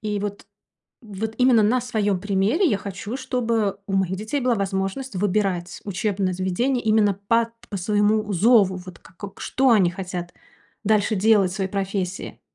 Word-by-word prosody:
И 210 -1 -2
вот 205 0 -5 0.5
вот 220 0 -5
именно 250 -3 +5
на 245 +5 +2
своём 210 -6 -1
примере 205 - +1
я 240 - +2
хочу, 200 +4 -6
чтобы 230 -6 -1
у 195 - -5
моих 190 -1 +1
детей 220 +8 -3
была 250 -1 +2
возможность 195 +5 -3
выбирать 190 -2 -1
учебные 200 -2 -1
заведения 215 +8 0
именно 215 -2 +3
по 230 +4 0 0.2
по 205 - -3
своему 210 +2 +1
зову. 200 0 +4
Вот 185 -1 -10
как 195 +2 -12
Что 265 0 +2
они 195 -7 +4
хотят 180 -1 -6 0.5
дальше 215 +1 +2
делать 200 -2 +3
в - - -6
своей 190 -1 -2
профессии? 195 -1 -3
205 Hz, 160 wpm, -23 LUFS, 190-225 Hz, 0.5 s, именно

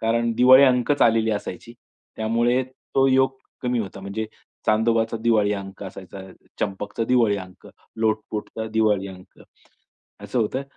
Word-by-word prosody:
कारण 115 +1 +1
दिवाळी 130 +2 +8
अंकच 125 +2 +2
आलेली 115 -1 +3
असायची. 105 +2 -6 0.4
त्यामुळे 120 +3 +1
तो 135 +1 -1
योग 130 0 +2 0.3
कमी 125 -1 0
होता. 100 -2 -5
म्हणजे 100 +3 -4 0.4
चांदोबाचा 115 +1 +2
दिवाळी 110 -3 +2
अंक 100 0 -8
असायचा, 95 0 -9 0.4
चंपकचा 105 +3 -3
दिवाळी 115 -4 +3
अंक, 95 -1 -12 0.3
लोटपोटचा 110 0 -2
दिवाळी 105 -3 +1
अंक, 90 -1 -14 0.8
असं 105 +5 -3
होतंय. 130 +5 -1
110 Hz, 130 wpm, -23 LUFS, 100-120 Hz, 0.8 s, दिवाळी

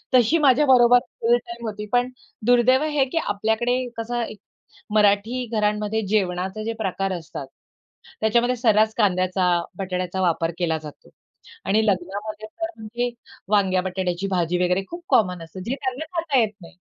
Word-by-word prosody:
तशी 250 +6 +5
माझ्या 265 +3 +5
बरोबर 245 -2 +6 0.2
फुल 470 +1 +4
टाईम 355 - -9
होती. 210 0 -5
पण 245 +1 +3 0.4
दुर्दैव 245 +3 +4
हे 295 -3 +1
की - - -2
आपल्याकडे 220 +4 0 0.2
कसं 240 +1 -2
एक 215 - -8 0.6
मराठी 210 +4 +3
घरांमध्ये 210 0 0
जेवणाचे 190 0 -1
जे 230 - -2
प्रकार 195 -1 -1
असतात, 160 -5 -7 0.7
त्याच्यामध्ये 240 +3 +2
सर्रास 220 -2 +3
कांद्याचा, 185 -2 +2 0.3
बटाट्याचा 185 -1 -3
वापर 165 -1 +1
केला 165 -3 0
जातो. 150 -2 -12 0.5
आणि 215 +2 +2
लग्नामध्ये 205 +3 -2
तर 330 +9 -5
म्हणजे 235 +3 -3 0.4
वांग्या-बटाट्याची 185 -2 0
भाजी 175 -1 0
वगैरे 180 +2 +1
खूप 345 0 -8
कॉमन 180 -5 +2
असते. 165 +3 -10
जे 265 - +1
त्यांना 265 +2 -3
खाता 325 -5 +1
येत 220 -2 +1
नाही. 170 - -14
215 Hz, 145 wpm, -23 LUFS, 185-245 Hz, 0.7 s, बरोबर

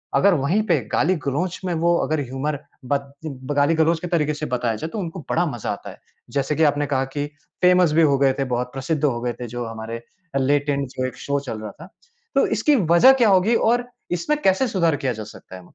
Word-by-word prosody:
अगर 200 0 +5
वही 165 +7 +1
पे 165 -4 +4
गाली-गलौच 170 +1 0
में 180 - -1
वो 170 +1 +3
अगर 155 0 -1
ह्यूमर 135 +3 -3 0.3
ब 140 +3 +2 0.6
गाली-गलौच 160 +3 +3
के 180 - -5
तरीक़े 150 -3 +1
से 150 +1 -4
बताया 120 -4 -1
जाए, 160 +10 -5
तो 215 - -5
उनको 180 -1 -5
बड़ा 175 +2 +2
मज़ा 120 -11 -3
आता 100 - -7
है। - - -12 0.3
जैसे 140 +1 0
कि 160 - +2
आपने 145 -1 +2
कहा 135 -1 0
कि 145 0 -1 0.4
फेमस 180 -2 +5
भी 165 - +4
हो 145 -3 +4
गए 135 -1 +4
थे - - +2
बहुत, 125 0 -2
प्रसिद्ध 145 +3 -2
हो 125 -5 +1
गए 120 0 -2
थे 120 - -4
जो 120 +1 -5
हमारे 115 +1 -6 0.4
लेट 145 +2 +1
एंड 140 -1 0
जो 130 0 -3
एक 125 - -8
शो 140 0 -1
चल 125 -6 -6
रहा 105 -1 -6
था। 170 - -11 0.5
तो - - +4
इसकी 300 - +2 0.2
वज़ह 255 +11 +8
क्या 240 -5 +3
होगी 195 +4 +4
और 245 +2 +1 0.3
इसमें 300 - 0
कैसे 190 +5 +3
सुधार 170 -8 +1
किया 130 -3 -1
जा 110 -1 -6
सकता 105 -3 -12
है? 95 - -10
145 Hz, 225 wpm, -22 LUFS, 130-175 Hz, 0.6 s, वज़ह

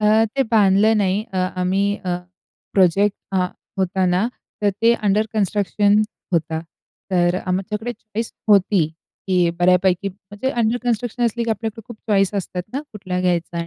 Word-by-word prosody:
अ, 215 +1 +4
ते 270 - +4
बांधलं 210 0 +4
नाही. 200 0 +1
अ, 190 - -4 0.2
आम्ही 190 +2 +1 0.2
अ, 180 - -1 0.6
प्रोजेक्ट 195 +2 +4 0.2
अ, 190 - +2 0.4
होत 190 +1 -1 0.2
ना 180 - +2 0.4
तर 205 - +4
ते 230 +1 +6
अंडर 210 +2 +3
कन्स्ट्रक्शन 205 0 +2 0.3
होता. 160 -1 0 0.5
तर 175 -1 +2
अ, - - -3
आमच्याकडे 210 +6 -2
चॉइस 225 0 -6 0.2
होती, 195 -4 +4 0.4
की 185 - +2 0.2
बऱ्यापैकी. 180 +1 +3
म्हणजे 205 +6 -5
अंडर 225 +1 +2
कन्स्ट्रक्शन 240 0 -1
असली, 235 +1 0
की 230 - -1
आपल्याकडे 225 0 -3
खूप 235 - -9
चॉईस 195 -1 +3
असतात 180 -2 -3
ना, 275 - -2
कुठला 185 -3 -3
घ्यायचा. 170 -1 -1
200 Hz, 155 wpm, -21 LUFS, 185-220 Hz, 0.6 s, ते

